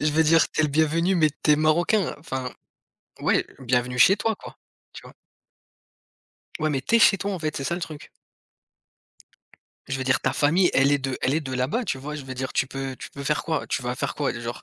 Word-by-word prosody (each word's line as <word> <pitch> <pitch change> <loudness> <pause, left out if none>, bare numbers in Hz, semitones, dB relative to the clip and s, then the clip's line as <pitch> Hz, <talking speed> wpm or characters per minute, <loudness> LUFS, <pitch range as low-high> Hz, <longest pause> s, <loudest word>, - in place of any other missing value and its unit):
je 150 +1 +1
veux 160 - +4
dire, 160 0 +4
tu - - -1
es - - +4
le - - +1
bienvenu 160 +5 +2
mais 155 -3 +3
tu 150 - +5
es 150 - +4
Marocain, 170 +6 +2
enfin. 130 -4 -5 0.7
Ouais, - - +1
bienvenue 125 -1 -1
chez 190 +11 +6
toi, 220 +1 -1
quoi, - - -12 0.3
tu - - -11
vois? - - -14 1.4
Ouais, 155 -1 0
mais 135 - -1
tu 230 +12 +2
es - - +5
chez 210 - +6
toi, 200 +2 -3
en 185 - -3
fait, 155 -2 -3
c'est 135 - -3
ça 170 - -1
le - - -6
truc. 155 -3 -8 1.8
Je 135 - -3
veux 130 - -3
dire, 130 0 +2
ta - - 0
famille, 170 +5 +3
elle 135 +2 +4
est 145 - +3
de 135 -1 -3
elle 135 +3 +1
est 160 - +1
de 130 -3 -6
là-bas, 130 - -1
tu 135 - -2
vois, 150 +3 -6
je 150 -3 -7
veux 130 0 -7
dire, 130 +1 -4
tu 130 - +1
peux 135 -1 -5
tu - - -9
peux 140 - -8
faire 150 +2 0
quoi 160 -3 -2
tu - - -2
vas 125 +1 -2
faire - - -3
quoi? 145 - -1
Genre, 120 0 -6
150 Hz, 240 wpm, -24 LUFS, 130-165 Hz, 1.8 s, chez